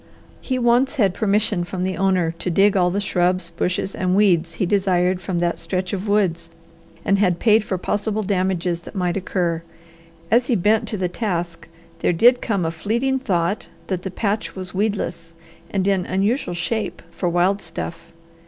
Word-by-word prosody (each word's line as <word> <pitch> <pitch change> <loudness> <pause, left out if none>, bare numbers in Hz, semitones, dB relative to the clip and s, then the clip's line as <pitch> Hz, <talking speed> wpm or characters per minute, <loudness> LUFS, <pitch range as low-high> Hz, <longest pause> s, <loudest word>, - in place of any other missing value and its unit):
He 255 - -2
once 245 +3 +3
had 200 -9 +2
permission 205 -2 +1
from 180 +1 -4
the 185 0 -1
owner 185 -3 +1
to - - -2
dig 195 +4 +4
all 180 -2 +3
the 195 +3 -1
shrubs, 180 -3 0
bushes, 180 +3 -2
and 185 0 0
weeds 175 -5 +3
he - - 0
desired 185 -1 +1
from 180 -1 -3
that 170 0 0
stretch 185 0 -3
of 195 +2 -3
woods, 180 -5 +1 0.6
and 200 0 +3
had 180 -4 +2
paid 220 +2 +4
for 190 - -2
possible 210 +3 -1
damages 185 -3 0
that - - -12
might 180 -2 0
occur. 175 -3 -1 0.7
As 240 +2 +4
he 245 - +2
bent 215 +4 +2
to 210 - -2
the 185 -1 0
task 175 -4 -3 0.3
there - - +1
did 245 +8 +5
come 200 -7 0
a 160 - 0
fleeting 235 +10 -1
thought 190 -5 -1 0.2
that 185 -2 -2
the 190 - -4
patch 205 +3 -2
was 185 -1 -7
weedless 185 -5 -2 0.3
and 195 -1 -1
in 190 -3 +1
unusual 195 +1 0
shape 215 +6 -3
for 180 - -2
wild 180 +4 +2
stuff. 165 0 -7
190 Hz, 180 wpm, -21 LUFS, 175-210 Hz, 0.7 s, did